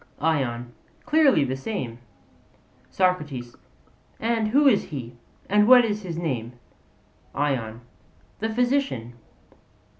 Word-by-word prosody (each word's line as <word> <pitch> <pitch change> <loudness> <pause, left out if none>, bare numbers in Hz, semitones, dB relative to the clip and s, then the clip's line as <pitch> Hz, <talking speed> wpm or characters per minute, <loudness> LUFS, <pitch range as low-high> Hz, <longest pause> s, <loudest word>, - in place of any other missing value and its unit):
ION: 125 -6 -1 0.3
Clearly 300 - +4
the 130 -1 -2
same. 135 - -5 0.9
SOCRATES: 150 -10 -1 0.6
And 225 -1 0
who 280 +6 +4
is 225 -7 +4
he, 120 -5 -7 0.3
and 210 +1 +3
what 250 -1 +8
is 210 -1 -2
his 175 -4 -6
name? 125 -8 -3 0.8
ION: 120 -6 -2 0.6
The 220 - -1
physician. 245 - 0
165 Hz, 100 wpm, -24 LUFS, -, 0.9 s, what